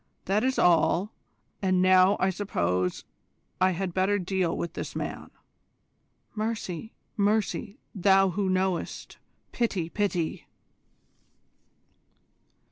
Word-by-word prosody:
That 200 Hz, +3 st, +1 dB
is 260 Hz, +1 st, +1 dB
all, 175 Hz, +4 st, +3 dB, 0.5 s
and 185 Hz, -2 st, +2 dB
now 185 Hz, +1 st, +5 dB
I 190 Hz, -, +2 dB
suppose 90 Hz, -, -1 dB, 0.6 s
I 185 Hz, -, +5 dB
had 185 Hz, 0 st, -3 dB
better 190 Hz, +3 st, +2 dB
deal 185 Hz, -2 st, -1 dB
with 170 Hz, -, -4 dB
this -, -, -6 dB
man." -, -, -5 dB, 1.0 s
"Mercy, 220 Hz, -2 st, -4 dB, 0.2 s
mercy, 210 Hz, +1 st, 0 dB, 0.2 s
Thou 195 Hz, -1 st, +4 dB
Who 195 Hz, +1 st, -1 dB
Knowest! 185 Hz, -1 st, -2 dB, 0.3 s
Pity, 195 Hz, -8 st, -1 dB
pity!" 180 Hz, -5 st, -2 dB
190 Hz, 100 wpm, -27 LUFS, 180-205 Hz, 1.0 s, now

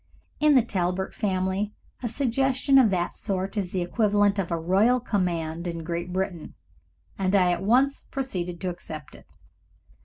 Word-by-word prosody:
In 300 Hz, -1 st, +5 dB
the 255 Hz, -, +6 dB
Talbert 190 Hz, -3 st, -2 dB
family 190 Hz, 0 st, -1 dB, 0.3 s
a 240 Hz, -, -2 dB
suggestion 270 Hz, +2 st, +2 dB
of 245 Hz, -5 st, +5 dB
that 175 Hz, -2 st, -1 dB
sort 195 Hz, -1 st, -3 dB
is 195 Hz, -4 st, -2 dB
the 185 Hz, -2 st, -1 dB
equivalent 205 Hz, +1 st, +2 dB
of 185 Hz, -, -1 dB
a 170 Hz, -, 0 dB
royal 195 Hz, +9 st, +3 dB
command 170 Hz, -6 st, -2 dB
in 170 Hz, -1 st, -4 dB
Great 170 Hz, +2 st, -4 dB
Britain, 185 Hz, -3 st, -3 dB, 0.6 s
and 190 Hz, +1 st, +1 dB
I 180 Hz, -2 st, +4 dB
at 175 Hz, 0 st, -1 dB
once 255 Hz, +7 st, +2 dB
proceeded 180 Hz, -10 st, -3 dB
to 185 Hz, -, -1 dB
accept 155 Hz, -4 st, -8 dB
it. -, -, -15 dB
190 Hz, 160 wpm, -26 LUFS, 175-225 Hz, 0.6 s, the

